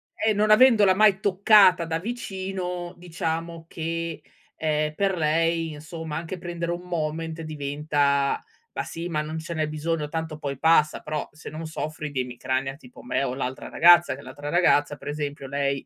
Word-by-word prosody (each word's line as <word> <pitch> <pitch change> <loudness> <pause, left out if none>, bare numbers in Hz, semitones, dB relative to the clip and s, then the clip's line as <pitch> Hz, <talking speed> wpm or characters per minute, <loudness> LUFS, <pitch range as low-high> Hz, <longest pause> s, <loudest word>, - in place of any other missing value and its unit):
eh, 220 - +1
non 215 +1 +2
avendola 215 -4 +6
mai 210 -2 +5
toccata 195 -3 +5
da 165 0 -2
vicino 190 -4 -4
diciamo 165 -1 -4
che, 165 0 -4 0.3
ehm, 155 -1 0
per 195 -2 0
lei 165 +1 +1
insomma 160 0 -7
anche 170 +3 -5
prendere 170 -1 -4
un 175 +1 -3
Moment 165 -1 -3
diventa: 145 -2 0 0.3
"Ma - - -2
sì 170 +2 -6
ma 155 -2 0
non 155 +1 -5
ce 165 +2 -6
n'è 155 -1 -1
bisogno, 155 0 -2
tanto 160 -1 -4
poi 140 -2 -4
passa." 155 -2 +3
Però 150 -1 -4
se 150 - -10
non 160 +1 -7
soffri 155 -1 -5
di 130 -2 -1
emicrania 130 +2 -3
tipo 245 +12 -15
me 240 - -1
o 125 - -2
l'altra 130 0 -4
ragazza 175 -3 +6
che 140 - -12
l'altra 145 +2 -8
ragazza 145 -4 +3
per 140 +1 -8
esempio 145 -2 -4
lei, 140 0 -1
160 Hz, 170 wpm, -25 LUFS, 150-175 Hz, 0.3 s, avendola